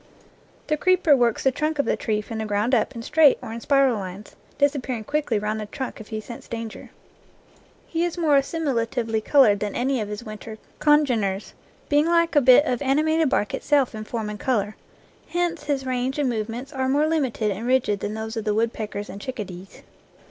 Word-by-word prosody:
The 305 - 0
creeper 365 -2 +4
works 240 -3 +1
the 265 - +4
trunk 305 +3 -2
of 280 - +1
the - - +1
tree 215 -2 -1
from 220 +1 -6
the 220 - -2
ground 210 +4 0
up 225 -1 +1
in 230 - -6
straight 300 +1 +5
or 220 - -7
in 230 - -6
spiral 275 -4 +3
lines, 190 +2 -8 0.2
disappearing 270 -5 0
quickly 285 -2 -1
round 210 +1 -2
the 215 - -5
trunk 260 0 -6
if 215 - -12
he 220 -2 -4
scents 230 +2 -10
danger. 230 -1 -7 1.0
He 330 0 -2
is 350 0 -2
more 315 -4 +3
assimilatively 245 -6 0
colored 230 -8 +5
than 205 -1 -3
any 260 -1 0
of 210 - -4
his 210 +2 -6
winter 215 0 -8 0.2
congeners, 245 -10 +2 0.3
being 295 +2 +3
like 335 -1 +2
a 290 - +6
bit 255 +3 +7
of 250 -5 -1
animated 310 +3 +2
bark 210 -5 0
itself 285 -4 +1
in 215 0 -6
form 215 -1 -4
and 210 - -7
color, 215 -5 0 0.5
hence 345 -1 -1
his 275 -2 -1
range 255 +1 -1
and 290 -2 +1
movements 235 +4 -4
are 260 -1 -1
more 290 +3 +3
limited 265 -9 0
and 210 +5 -4
rigid 250 -6 +2
than 210 +2 -4
those 220 +1 -5
of 225 - -3
the 210 -1 0
woodpeckers 215 -2 -2
and 200 - -9
chickadees. 195 -7 -7
245 Hz, 200 wpm, -24 LUFS, 215-290 Hz, 1.0 s, bit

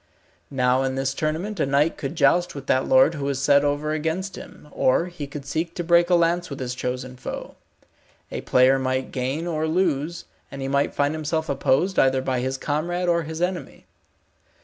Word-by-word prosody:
Now 125 -1 +2
in 135 0 -1
this 135 0 -1
tournament 165 +8 -3
a - - +2
knight 145 +4 +2
could 140 +2 -5
joust 170 +4 +2
with 140 -2 -7
that 130 0 +1
lord 130 +5 +5
who 145 -3 -4
was 140 -1 -1
set 140 +1 +4
over 145 +1 0
against 160 +5 -2
him, - - -12
or 130 +6 +2
he 175 -5 -7
could 140 0 -8
seek 165 +4 -3
to 175 - -3
break 170 +1 +4
a 180 - +5
lance 170 +1 +1
with 140 - -7
his 125 -1 -3
chosen 125 0 -4
foe. 125 - -7 0.8
A - - -4
player 130 +1 +4
must 130 0 -2
gain 135 +5 -2
or 160 -2 -1
lose, 165 -1 0 0.2
and 140 - -8
he 135 - -3
might 140 +1 0
find 145 +1 +1
himself 160 +1 -2
opposed 140 +7 +1
either 130 0 +3
by 130 -1 -1
his 130 +1 -2
comrade 170 +6 -2
or 170 -1 +2
his 160 +2 -4
enemy. 180 0 -4
145 Hz, 195 wpm, -23 LUFS, 135-170 Hz, 0.8 s, lord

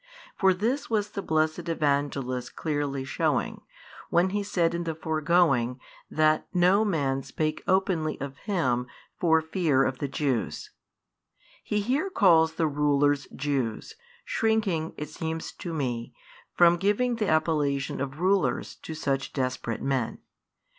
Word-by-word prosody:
For 190 -1 +4
this 230 +10 -1
was 210 -2 0
the 200 - -4
blessed 155 -1 +1
|513 - - -5
Evangelist 140 -5 -1
clearly 145 -3 -2
shewing, 135 - -1 0.5
when 180 +2 +3
he 205 +1 0
said 175 -4 +1
in 170 0 -2
the 165 -1 -2
foregoing 155 -6 +2 0.3
that 155 0 +2
no 180 +4 +4
man 140 -9 0
spake 155 +3 -2
openly 185 -5 +1
of 140 0 -5
Him 125 - 0 0.3
for 160 -2 +4
fear 160 -5 +2
of 130 -1 -1
the 140 - -1
Jews. 135 -4 -2 0.9
He 210 0 0
here 270 - 0
calls 165 - +4
the 160 0 0
rulers 145 -1 +2
Jews, 135 - -2 0.3
shrinking, 210 -8 0
it 150 - -5
seems 160 0 -4
to 175 - -7
me, 125 -7 -3 0.4
from 175 0 +6
giving 220 +6 +1
the 215 -3 0
appellation 150 -3 +1
of 140 +2 -4
rulers 190 +1 +1
to 160 - -8
such 135 -3 -2
desperate 130 -3 -2
men. 130 -4 -1
155 Hz, 140 wpm, -27 LUFS, 140-180 Hz, 0.9 s, from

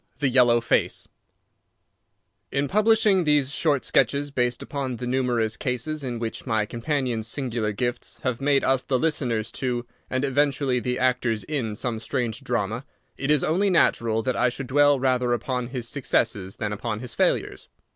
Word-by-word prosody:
The 140 - +1
Yellow 120 -2 +4
Face 115 - 0 1.4
In 140 +1 0
publishing 215 0 +3
these 145 -3 +2
short 145 -3 +1
sketches 140 +3 +1
based 125 -2 0
upon 135 -3 -3
the 125 - -5
numerous 120 -3 0
cases 140 +3 -2
in 125 -3 -3
which 115 +3 -5
my 110 -3 +1
companion's 120 -1 -2
singular 115 -4 -1
gifts 120 +4 -3
have 125 -1 -1
made 140 0 +3
us 130 -1 +2
the 130 - 0
listeners 120 -7 -1
to, 125 -2 -1 0.2
and 130 +2 0
eventually 140 -2 +1
the 125 +2 -2
actors 125 -4 +1
in, 125 -8 -3
some 115 0 -2
strange 120 +1 -2
drama, 115 -1 -2 0.3
it 135 - -4
is 150 -3 +3
only 190 +6 +2
natural 115 -10 +2
that 130 -2 0
I 125 - +3
should 130 +2 -6
dwell 145 +2 +4
rather 125 -2 +1
upon 125 +1 -2
his 125 -2 -4
successes 115 -7 -1
than 105 -2 -3
upon 110 +1 -4
his 125 -2 -6
failures. - - 0
125 Hz, 165 wpm, -25 LUFS, 115-140 Hz, 1.4 s, Yellow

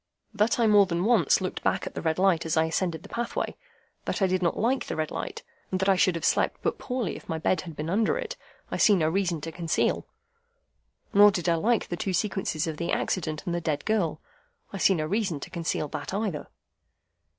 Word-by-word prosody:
That 210 +2 +2
I 235 - +4
more 205 -2 +6
than 170 +1 -1
once 215 - +4
looked 185 - -3
back 190 - 0
at - - -6
the - - -4
red 160 -1 0
light 185 -3 +3
as 160 -1 -1
I 160 - +4
ascended 165 0 -2
the - - -12
pathway, 235 0 -3 0.5
that - - -2
I 195 - +3
did 185 0 +1
not 170 - +1
like 250 +5 0
the - - -3
red 155 -1 -2
light, - - -5 0.3
and 185 - -1
that 190 - 0
I 195 - +5
should 180 -1 +3
have 165 - -3
slept - - +2
but - - -1
poorly 250 - -2
if - - -12
my 160 - -1
bed 160 +2 +1
had 165 -4 -9
been 150 +2 -4
under 210 - +1
it, - - -4 0.4
I - - -1
see 210 - +5
no 160 -4 +2
reason 175 -2 0
to 165 - -5
conceal. 165 0 0 1.1
Nor 205 +1 +8
did 180 -3 -2
I 170 - +4
like 215 +7 +1
the 175 - -3
two 200 -4 -2
sequences 190 -6 -1
of 160 -2 -4
the 170 - -2
accident 155 -4 -1
and 175 - -2
the 175 - -1
dead 155 -3 -2
girl. 180 -8 0 0.5
I 195 - -4
see 190 - +4
no 155 -2 -1
reason 190 -3 -1
to - - -8
conceal 170 -3 -2
that 190 - -5
either. 200 -8 -2
180 Hz, 230 wpm, -27 LUFS, 160-205 Hz, 1.1 s, Nor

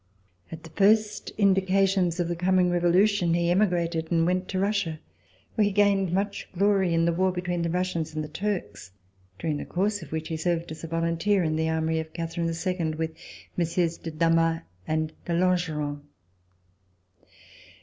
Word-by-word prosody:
At 165 0 -8
the 165 - -12
first 210 +3 +2
in(Hcations 190 -2 +2
of 175 - +1
the 175 - -2
coming 180 +1 +2
Revolution, 175 +1 +3
he 170 0 +1
emigrated 175 -4 +1
and 165 -1 +3
went 185 +1 0
to 190 - -2
Russia, 195 -5 0 0.5
where 215 - +2
he 205 - +1
gained 200 -2 +3
much 200 +2 -2
glory 195 -2 +3
in 165 0 +2
the 170 - +2
war 185 +2 +2
between 180 -1 -2
the 170 - -1
Russians 170 -3 -2
and 155 - -2
the - - -5
Turks, 150 - -4 0.4
during 155 -3 -2
the - - -5
course 200 +3 -1
of 160 - -11
which 160 0 -3
he 160 - -2
served 170 0 -1
as 160 - -8
a - - -4
volunteer 165 +4 +1
in 155 -1 0
the 160 0 0
army 160 0 0
of 160 0 -6
Catherine 165 0 -3
II 165 -1 -2
with 160 0 -3 0.5
MM. 170 0 0
de 165 - -5
Damas 165 +1 +2 0.3
and 155 0 -1
de 170 - -2
Langeron. 165 -5 0
170 Hz, 170 wpm, -26 LUFS, 165-190 Hz, 0.5 s, Revolution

